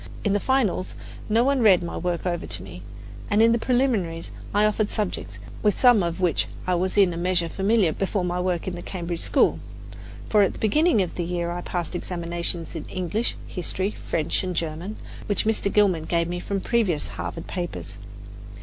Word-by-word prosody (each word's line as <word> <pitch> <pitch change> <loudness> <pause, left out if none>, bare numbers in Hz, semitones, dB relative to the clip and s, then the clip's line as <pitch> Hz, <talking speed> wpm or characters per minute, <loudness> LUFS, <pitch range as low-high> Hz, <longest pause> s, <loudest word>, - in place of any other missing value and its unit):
In 205 - +2
the 205 - +2
finals, 235 -7 0 0.3
no 225 +2 +4
one 275 0 +2
read 195 -6 +6
my 170 - -5
work 175 0 -2
over 175 -2 -2
to - - -3
me, - - -10 0.5
and 205 -1 +2
in 225 +1 +6
the 235 - +2
preliminaries 220 -11 0 0.2
I 210 +1 +3
offered 215 0 +1
subjects 180 - -3 0.2
with 210 -2 +2
some 245 -5 +6
of 170 0 -2
which 180 -4 +1 0.2
I 185 - +1
was 185 +3 0
in 190 -4 +5
a - - -5
measure 175 -1 +2
familiar 195 -1 +2
before 195 +1 -1
my 180 0 -1
work 180 -1 -1
in 185 - -2
the 175 - -6
Cambridge 175 -2 -4
school; - - +3 0.7
for 210 - +4
at 195 - +3
the - - -10
beginning 295 - +3
of 180 - -5
the 175 - -2
year 170 0 -2
I 175 - -3
had 175 - -6
passed 175 -3 -3
examinations 170 -1 -3
in 160 - -6
English, 185 +5 -2
History, 185 +2 -2 0.2
French 160 +2 0
and 185 -1 -3
German, 165 +6 -3 0.3
which 205 0 0
Mr. 215 -2 +1
Gilman 190 -7 +3
gave 170 0 +1
me 175 +1 -3
from 195 +2 -3
previous 195 -11 0
Harvard 165 - -5
papers. 175 - -5
185 Hz, 195 wpm, -24 LUFS, 170-210 Hz, 0.7 s, read